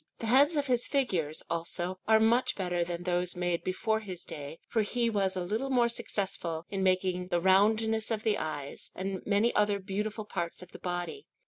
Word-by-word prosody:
The - - -5
heads 275 +7 +5
of 290 -1 +1
his 245 -3 +1
figures, 180 - 0
also, 175 +2 -2
are 220 0 +6
much 230 +3 +3
better 180 -3 0
than 175 0 -4
those 180 0 0
made 175 -1 -1
before 220 +4 0
his 190 -5 -5
day, 145 +1 -6
for 225 - +1
he 235 +2 0
was 195 -3 +1
a 185 - -1
little 220 +9 -2
more 245 -3 +3
successful 180 -7 -3
in 195 -1 -1
making 185 -1 +1
the 175 -2 +1
roundness 220 +4 +3
of 220 -2 -1
the 215 -2 +2
eyes, 145 -3 -4
and 190 0 -3
many 210 +3 +3
other 205 -1 +3
beautiful 210 +2 -3
parts 175 -3 -4
of 180 - -15
the - - -10
body. 175 - -4
195 Hz, 195 wpm, -30 LUFS, 175-220 Hz, -, are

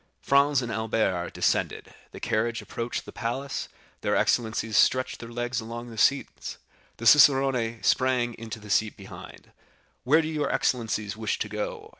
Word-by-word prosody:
Franz 140 -1 +3
and 120 - -4
Albert 110 -5 -1
descended, - - -1 0.2
the - - -11
carriage 115 +1 -1
approached 115 +1 -5
the - - -9
palace; 130 +4 -4 0.3
their - - 0
excellencies 110 -1 0
stretched 130 +4 +3
their 115 - -9
legs 120 0 -3
along 120 +1 -7
the - - -9
seats; 140 +5 0 0.4
the 115 - -7
cicerone 135 -4 +5
sprang 125 -2 +2
into 115 0 -7
the 105 -1 -9
seat 110 +2 +1
behind. 95 - -12 0.5
"Where 155 +5 +4
do - - -3
your 150 -3 -1
excellencies 110 -4 -1
wish 110 -1 -2
to - - -3
go?" 105 0 -5
115 Hz, 155 wpm, -26 LUFS, 110-130 Hz, 0.5 s, cicerone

